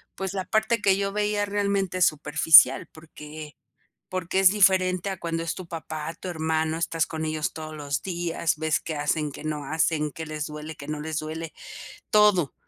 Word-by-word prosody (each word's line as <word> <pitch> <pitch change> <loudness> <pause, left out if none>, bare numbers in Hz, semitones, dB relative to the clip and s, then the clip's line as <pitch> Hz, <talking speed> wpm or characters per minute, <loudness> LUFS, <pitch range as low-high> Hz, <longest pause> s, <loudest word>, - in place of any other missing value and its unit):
pues, 195 0 -4
la 190 -1 -2
parte 220 +1 +1
que 195 -2 +3
yo 200 0 -1
veía 210 0 0
realmente 200 -2 -1
es 180 - +6
superficial 150 +2 +5
porque 155 -2 -11 0.5
porque 185 +1 -2
es 190 -2 +7
diferente 190 -2 +3
a 190 - -4
cuando 165 -1 -3
es 165 - -3
tu 185 -2 -8
papá, 160 -1 -6
tu 185 - -9
hermano, 160 -1 -1
estás 165 -1 0
con 160 -1 -4
ellos 155 -1 -2
todos 155 -1 -7
los 145 0 -3
días, 170 -4 -1
ves 160 0 0
qué 160 - -5
hacen, 150 0 -1
qué 145 - -10
no 150 -2 -3
hacen, 155 0 0
qué 160 +3 -7
les 155 -1 -4
duele, 150 +1 -7
qué 140 - -10
no 150 -1 -4
les 155 0 -4
duele, 160 +1 -6 0.6
todo. 205 -8 +4
160 Hz, 190 wpm, -25 LUFS, 155-190 Hz, 0.6 s, es